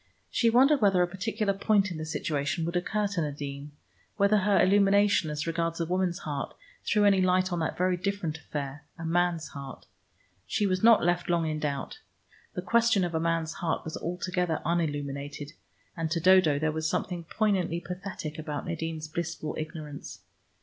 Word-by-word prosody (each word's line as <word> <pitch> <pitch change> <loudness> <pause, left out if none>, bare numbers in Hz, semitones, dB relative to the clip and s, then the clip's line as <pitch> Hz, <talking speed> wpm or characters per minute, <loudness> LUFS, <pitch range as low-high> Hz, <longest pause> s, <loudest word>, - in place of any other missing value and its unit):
She 235 - +3
wondered 270 +4 +5
whether 195 -3 +4
a - - +1
particular 200 +3 -1
point 200 0 +2
in 165 - -5
the 155 - -5
situation 155 +1 -1
would 170 +2 -3
occur 210 +4 0
to 195 -4 -1
Nadine, 145 -1 -5 0.5
whether 200 +1 +4
her 200 0 +3
illumination 200 -2 +4
as 150 0 -3
regards 165 0 -1
a 165 - 0
woman's 180 0 0
heart 145 -5 -5 0.3
threw 210 -1 +2
any 195 -2 +5
light 185 0 +2
on 175 - -1
that 160 - -2
very 180 0 +2
different 180 -4 -2
affair, 145 -2 -5
a 165 - -6
man's 170 0 +1
heart. 140 -2 -9 0.6
She 210 - 0
was 185 -1 0
not 225 -5 +6
left 175 0 +1
long 170 -1 +2
in 155 -1 -2
doubt. 145 - -3 0.6
The - - -3
question 235 -4 +3
of 175 -1 -2
a 160 - +1
man's 165 -1 0
heart 165 -2 -2
was 160 - -5
altogether 180 -1 -2
unilluminated, 145 -3 -2 0.4
and 165 -2 -2
to 165 +1 0
Dodo 180 -4 +5
there 155 +1 0
was 160 0 -1
something 175 -2 -2
poignantly 190 -4 0
pathetic 180 -4 -6
about 150 -2 -4
Nadine's 160 -1 -4
blissful 160 -1 -4
ignorance. 155 -2 -7
170 Hz, 175 wpm, -28 LUFS, 155-190 Hz, 0.6 s, not